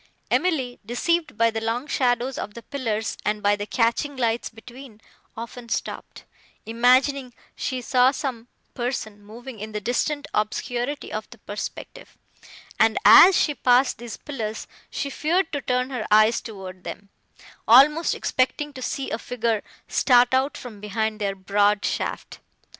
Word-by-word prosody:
Emily, 275 -9 0
deceived 305 +6 -1
by 230 0 +3
the 225 0 -3
long 230 +4 -2
shadows 250 -3 0
of 205 - -6
the 235 - -9
pillars 225 -6 -3
and 210 0 -1
by 205 0 +4
the 205 0 -6
catching 245 +5 0
lights 235 -2 0
between, 240 0 -13 0.4
often 235 +1 -8
stopped, - - -5 0.4
imagining 250 +3 +2 0.2
she 255 -2 -3
saw 250 +2 +4
some 265 -5 -4 0.3
person, 230 -4 -4
moving 235 +3 -10
in 215 +1 -7
the 210 - -2
distant 280 +7 -1
obscurity 245 +6 -2
of 215 0 -5
the 235 - -13
perspective; 205 0 -8 0.6
and, 220 0 +4
as 370 +1 +9
she 295 - +2
passed 255 -2 +3
these 235 -2 -7
pillars, 225 -7 -5 0.2
she 280 - -4
feared 330 +6 0
to 285 - -2
turn 250 +1 -1
her 245 -5 -3
eyes 215 +2 +5
toward 190 -4 -9
them, 200 - -8 0.6
almost 295 +8 +6
expecting 290 +3 -1
to 260 - -9
see 265 +2 -3
a 220 - -2
figure 230 -3 -1 0.3
start 245 -1 +4
out 265 +2 +1
from 230 -5 -10
behind 215 +1 -2
their 200 -1 -1
broad 205 +2 +1
shaft. - - -3
240 Hz, 150 wpm, -24 LUFS, 215-265 Hz, 0.6 s, as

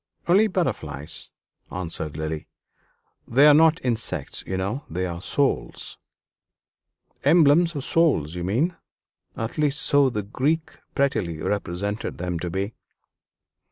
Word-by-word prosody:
"Only 195 +5 +5
butterflies," 85 - -3 0.4
answered 80 -4 -4
Lily; 80 0 -4 0.8
"they 135 +5 +5
are 150 - +9
not 160 +2 +5
insects, 115 -2 -2
you 95 - -2
know; 100 +9 -2
they 90 +3 -2
are 85 -1 -5
souls." 130 - -1 1.2
"Emblems 165 +1 +5
of 140 - -3
souls, 140 - +2
you 90 -1 -4
mean 130 - 0 0.6
at 115 +6 -4
least 150 -1 +2
so 140 0 +4
the 105 -4 -3
Greeks 145 +10 -1 0.2
prettily 105 - 0
represented 100 +2 -3
them 90 -1 -3
to 90 - -3
be." 95 +5 -3
110 Hz, 120 wpm, -24 LUFS, -, 1.2 s, are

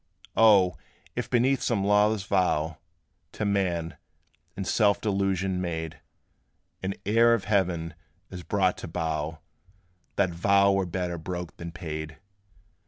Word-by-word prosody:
O! 100 -7 +5 0.4
if - - -3
beneath 125 +2 +2
some 110 -5 0
lawless 105 0 +3
vow 85 -5 0 0.5
To 105 - -3
man, 90 -5 -1 0.6
in 95 - -3
self 100 -1 +3
delusion 95 -2 0
made, 80 -2 -4 0.8
An 95 +1 -2
heir 115 +3 +5
of 110 - -4
heaven 90 -5 0 0.4
is 90 -1 -7
brought 95 0 0
to - - -6
bow, 80 -2 -3 0.7
That 95 -3 +2
vow 100 +3 +3
were 95 -1 +1
better 90 -1 -3
broke 90 +1 -5
than 85 0 -7
paid. 80 -2 -6
95 Hz, 125 wpm, -27 LUFS, 85-100 Hz, 0.8 s, O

